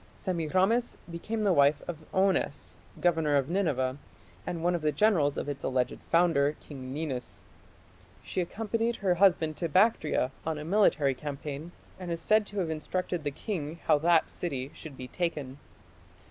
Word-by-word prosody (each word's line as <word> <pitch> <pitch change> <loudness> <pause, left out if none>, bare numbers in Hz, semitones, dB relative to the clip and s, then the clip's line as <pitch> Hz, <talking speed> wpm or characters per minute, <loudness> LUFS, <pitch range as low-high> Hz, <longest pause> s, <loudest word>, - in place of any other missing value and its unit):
Semiramis 185 +6 +1
became 215 +6 -3
the 200 -3 +4
wife 145 -1 +4
of 160 -3 -7
Onnes, 190 -6 0 0.2
governor 160 -4 +2
of 140 0 +1
Nineveh, 145 -8 0 0.5
and 170 -2 -3
one 175 +1 +3
of 175 - -1
the 155 0 +2
generals 150 -4 +3
of - - -3
its 145 -1 -4
alleged 130 -1 0
founder, 160 -4 +3
King 130 -3 -9
Ninus. 125 - -4 0.8
She 185 - -2
accompanied 225 +5 -1
her 190 -4 +1
husband 170 -4 +3
to 170 - -2
Bactria 160 - +3
on 160 -1 -2
a 150 - -6
military 160 -7 +3
campaign, 145 +3 -6 0.3
and 180 -2 -6
is 170 -1 -2
said 215 +4 +3
to 205 - -8
have 165 -3 -2
instructed 175 +2 -3
the 145 - 0
king 160 0 -5
how 150 - +4
that 165 +1 +4
city 140 -5 -4
should 150 -4 -10
be 130 - -7
taken. 145 -4 -3
160 Hz, 160 wpm, -29 LUFS, 145-185 Hz, 0.8 s, the